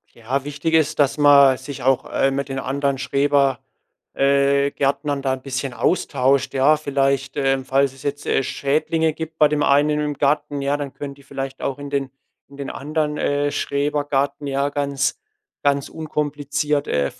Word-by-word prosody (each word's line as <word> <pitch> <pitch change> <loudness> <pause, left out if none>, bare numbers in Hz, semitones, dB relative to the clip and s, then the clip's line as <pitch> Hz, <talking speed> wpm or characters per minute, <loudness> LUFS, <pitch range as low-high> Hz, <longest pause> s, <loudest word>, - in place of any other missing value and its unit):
Ja, 130 +4 -2
wichtig 145 +3 -3
ist, 160 -2 +2
dass 145 0 +2
man 140 -2 +7
sich 135 0 -8
auch, 135 0 +2
äh, 135 - +2
mit 140 0 -3
den 135 - -4
anderen 140 +1 -1
Schreber 140 -1 +1 0.5
äh, 140 0 +2
Gärtnern 140 0 -1
da 135 -1 0
'n 130 - -5
bisschen 135 -1 -3
austauscht, 140 -4 +1
ja. 140 +4 +4
Vielleicht, 140 -1 -1
äh 135 -1 +1
falls 135 +1 +1
es 135 - -15
jetzt, 145 0 -3
äh, - - +2
Schädlinge 155 +4 0
gibt 160 +1 -7
bei 150 - +6
dem 150 0 -1
einen 150 +2 +3
im 150 -1 -2
Garten, 145 0 0
ja, 140 +1 +1
dann 140 -2 -5
können 140 -1 -6
die 140 - -19
vielleicht 135 -1 -6
auch 135 - -2
in 145 0 -8
den 140 -2 -2 0.4
in 140 - -14
den 140 - -5
anderen, 150 +1 -2
äh, 145 0 0
Schrebergarten 145 0 -1
ja 140 +1 0
ganz 140 -1 -1 0.4
ganz 140 -1 +1
unkompliziert, 145 -1 -2
äh,. 70 -1 0
140 Hz, 175 wpm, -21 LUFS, 135-145 Hz, 0.5 s, man